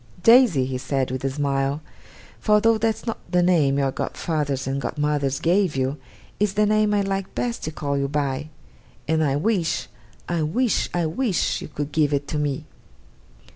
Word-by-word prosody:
'Daisy,' 230 - +6
he 130 -1 -3
said, 130 -1 -1
with 130 0 -4
a 135 - +1
smile 140 0 -1 0.6
'for 210 -1 +4
though 225 +1 +3
that's 220 0 -1
not 225 - -3
the 180 0 +3
name 155 -6 +3
your 135 -1 +1
godfathers 145 -3 -2
and 135 +1 -2
godmothers 145 -2 -1
gave 175 0 +2
you, 135 +1 0 0.4
it's 205 -1 +1
the 210 +1 +3
name 215 0 +2
I 205 -1 +2
like 195 -1 -3
best 240 -1 -2
to 155 - -3
call 140 -2 -2
you 140 - 0
by 145 0 -2 0.6
and 160 +1 +2
I 140 -2 +1
wish, 165 -1 0 0.4
I 170 -2 -1
wish, 220 +11 +1
I 175 -1 0
wish, 195 +4 0
you - - -6
could 145 -1 -5
give 145 -1 +2
it 140 0 -3
to 150 - -1
me! 145 0 -2
155 Hz, 180 wpm, -23 LUFS, 140-195 Hz, 0.6 s, Daisy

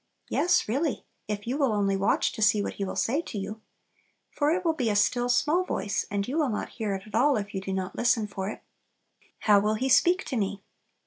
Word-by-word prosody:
Yes, 355 +1 +2
really, 275 +7 -1 0.2
if 205 -1 -4
you 255 +5 -2
will 275 -5 +2
only 200 -1 +1
watch 195 +1 +1
to 220 - -7
see 210 -1 +4
what - - -3
He 200 - -4
will 190 - -4
say 230 - +1
to 225 - -7
you. 210 +2 -5 0.7
For 290 0 +1
it 360 +3 0
will 325 - +3
be 255 -7 -1
"a 205 - 0
still, 245 +4 +2
small 305 +8 +2
voice," 200 - -2
and 200 0 -2
you 285 +6 -1
will 295 -4 +2
not 210 - -3
hear 215 -4 -3
it 190 - -7
at 215 - -15
all 260 +4 +3
if 205 -1 -5
you 190 - -3
do 195 - -5
not 190 0 -3
listen 235 -2 +2
for 195 -1 -4
it. - - -8 0.8
"How 205 -2 +5
will 210 +2 +1
He 260 +5 -1
speak 355 +8 +4
to 265 - -4
me?" 200 -1 -2
215 Hz, 240 wpm, -27 LUFS, 200-270 Hz, 0.8 s, How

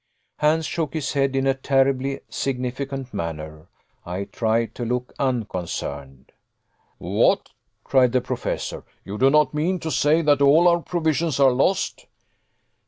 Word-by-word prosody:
Hans 155 +1 +2
shook 160 -1 -3
his 150 -4 -2
head 135 -1 +1
in 135 0 +1
a 135 - +3
terribly 135 0 0
significant 135 0 -4
manner. 80 -1 -6 0.4
I 90 +3 -4
tried 115 +2 -1
to 120 - -5
look 125 +1 -3
unconcerned. 85 - -4 0.7
"What!" - - +1 0.3
cried 130 -2 +3
the 130 - +3
Professor, - - -4 0.2
"you 100 +2 -6
do 135 - +5
not 150 -1 +3
mean 170 +5 0
to 160 - -3
say 155 +3 +3
that 145 -2 +3
all 150 +5 +6
our 170 0 +4
provisions 160 -3 -1
are 135 -2 +6
lost?" 140 +10 0
135 Hz, 140 wpm, -23 LUFS, 115-150 Hz, 0.7 s, all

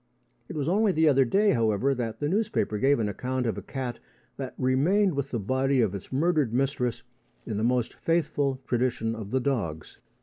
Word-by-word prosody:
It - - -6
was 145 -2 -2
only 205 +4 +3
the 160 -2 +3
other 135 -2 +5
day, 200 - +3
however, 115 +3 +2
that 120 -4 -4
the 145 - -1
newspapers 175 - 0
gave 140 +1 +4
an 110 - 0
account 125 +5 -2
of 115 - 0
a - - -6
cat 130 -3 -5 0.4
that 135 -2 -6
remained 165 +10 +2
with 140 -1 -2
the 120 - -2
body 130 +5 +1
of 110 -5 +2
its 100 - -8
murdered 150 -2 +1
mistress 125 -1 -1 0.4
in 105 - -3
the 110 - -1
most 125 0 +1
faithful 145 -5 0
tradition 120 -2 0
of 110 -3 -7
the 130 - +1
dogs. 105 - -3
130 Hz, 195 wpm, -27 LUFS, 115-145 Hz, 0.4 s, other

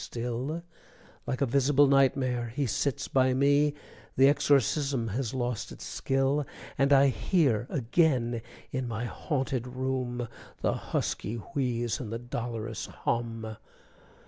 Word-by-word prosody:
_" - - -6
still 125 +7 -3 0.6
Like 130 - -2
a - - +5
visible 140 +3 +4
nightmare 135 -3 +3
he 145 -1 +1
sits 130 +3 -1
by 130 -1 +3
me, 145 +2 +3 0.4
The 135 +1 +7
exorcism 140 -3 +2
has 120 +3 -2
lost 120 -3 -2
its - - -9
skill; 135 +2 +1 0.3
And 135 +1 +2
I 140 0 +7
hear 130 - +1
again 125 -3 +1 0.3
in 130 -3 -2
my 115 +1 -3
haunted 130 -1 -2
room 125 -1 -2 0.3
The - - +2
husky 110 - -2
wheeze 120 +1 -2
and 115 -5 -5
the 115 - -2
dolorous 115 -2 -4
hum! 115 -2 -3
130 Hz, 130 wpm, -29 LUFS, 120-140 Hz, 0.6 s, The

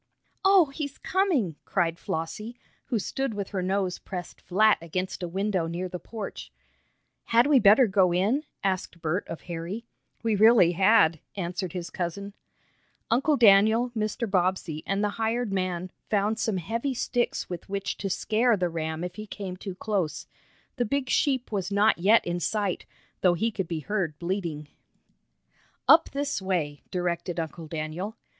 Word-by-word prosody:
"Oh, 385 -3 +6
he's 285 -2 -5
coming!" 305 - 0
cried 170 -3 0
Flossie, 210 +9 -4 0.3
who 235 - -1
stood 255 +3 -2
with 200 -1 -4
her 195 -3 -2
nose 190 0 -1
pressed 180 -2 -7
flat 215 +4 +3
against 185 +3 -4
a 175 - -2
window 190 -1 -1
near 175 +3 -3
the 180 0 -6
porch. 215 0 -7 0.7
"Had 235 +2 +4
we 285 -2 +5
better 215 +5 +7
go 190 -4 +3
in?" 205 - +1 0.2
asked 185 -3 -2
Bert 165 +4 -2
of 165 - -6
Harry. 175 +6 -5 0.4
"We 225 -2 +2
really 215 -4 +6
had," 185 -3 +4 0.2
answered 180 -1 -3
his 180 -2 -5
cousin. 195 +3 -4 0.8
Uncle 275 +5 +3
Daniel, 220 +3 +5
Mr. 220 +1 -2
Bobbsey 185 -4 0
and 195 +1 0
the 210 - +2
hired 225 -1 0
man 185 -1 -2 0.2
found 210 +2 +1
some 215 -4 0
heavy 230 - -2
sticks 240 0 -1
with 175 0 -7
which 200 0 -2
to 195 - -3
scare 220 +4 +2
the 180 -2 0
ram 160 0 -3
if 180 0 -6
he 215 0 -7
came 195 -3 -6
too 190 0 -7
close. 195 -6 -2 0.5
The 245 - +2
big 260 +2 -1
sheep 265 -5 +1
was 195 -2 -2
not 205 -1 +3
yet 210 +6 +5
in 175 0 -2
sight, 200 +1 -1 0.3
though 180 -2 +4
he 225 +7 0
could 190 -4 -3
be 160 -2 -3
heard 175 -6 -2
bleating. 170 -4 -3 1.2
"Up 320 +1 +7
this 280 -5 -2
way," 165 -7 -2
directed 175 -1 -2
Uncle 160 0 -5
Daniel. 165 +7 -4
195 Hz, 160 wpm, -27 LUFS, 175-220 Hz, 1.2 s, better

